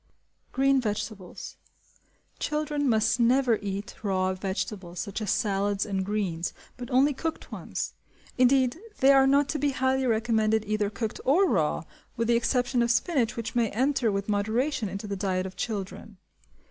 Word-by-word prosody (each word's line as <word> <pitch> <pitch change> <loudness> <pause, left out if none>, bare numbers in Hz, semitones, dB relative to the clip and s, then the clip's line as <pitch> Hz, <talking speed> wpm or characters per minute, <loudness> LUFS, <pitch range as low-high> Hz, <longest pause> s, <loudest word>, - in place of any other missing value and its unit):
Green 270 0 +3
Vegetables. 210 -4 -5 0.8
Children 300 -2 -1
must 220 +1 +2
never 240 -1 +3
eat 200 0 -4
raw 190 -3 0
vegetables, 190 -2 -4
such 200 +3 -4
as 210 - -3
salads 200 -2 0
and 195 -2 -2
greens, 190 -4 -2 0.2
but 245 -1 -8
only 275 +3 +4
cooked 320 +4 -5
ones; - - -4 0.4
indeed 255 +2 +3 0.2
they 270 +1 +6
are 270 -1 +6
not 280 +1 +4
to 300 - -1
be 290 +1 +2
highly 260 0 +1
recommended 220 -1 +1
either 210 -1 0
cooked 215 +1 -4
or 350 +9 +4
raw, 160 - +1 0.3
with 230 0 0
the 235 - +5
exception 245 +1 +1
of 235 - +1
spinach 245 -1 +1
which 225 -1 -4
may 235 -2 +2
enter 250 0 +1
with 200 0 -2
moderation 220 +4 0
into 195 +3 -6
the 200 -1 -3
diet 185 -1 -1
of 190 - -7
children. 205 -1 -5
225 Hz, 160 wpm, -27 LUFS, 200-260 Hz, 0.8 s, they